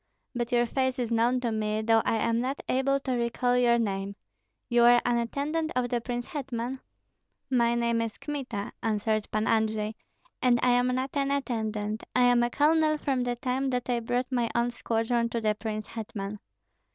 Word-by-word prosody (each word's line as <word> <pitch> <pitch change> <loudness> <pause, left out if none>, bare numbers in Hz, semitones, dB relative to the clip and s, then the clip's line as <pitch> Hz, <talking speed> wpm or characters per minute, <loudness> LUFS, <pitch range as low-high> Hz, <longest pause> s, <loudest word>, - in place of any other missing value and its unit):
But 240 0 -3
your 240 0 +3
face 260 +1 -1
is 240 -2 -2
known 235 +2 +2
to 235 -2 -1
me, 215 0 -1
though 225 0 +4
I - - +2
am 230 +1 +1
not 265 +3 -3
able 275 +1 +1
to 265 - -3
recall 245 +1 0
your 240 -1 +4
name. 200 -3 -2 0.5
You 240 -1 +3
are 240 0 +7
an 240 -1 +2
attendant 295 +7 -2
of 250 -1 0
the 240 -1 0
prince 240 0 -3
hetman?" 260 -3 -4 0.7
"My 235 -2 +3
name 235 -1 +1
is 225 -1 -4
Kmita," 265 -9 -4
answered 215 -1 0
Pan 215 +1 0
Andrei, 220 -1 +1 0.5
"and 245 -2 +4
I 250 - +4
am 245 0 +3
not 260 +1 -1
an 275 -1 +1
attendant; 220 -6 -2
I 250 - +5
am 245 -1 +5
a 240 - +2
colonel 310 +3 +3
from 270 -4 -1
the 245 0 -1
time 255 +3 -1
that 250 -1 -1
I 240 - +1
brought 245 +3 -2
my 240 -2 +1
own 240 +1 +1
squadron 235 0 0
to 235 - -2
the 215 -1 +1
prince 215 0 -4
hetman." 210 -2 -6
240 Hz, 190 wpm, -28 LUFS, 225-255 Hz, 0.7 s, are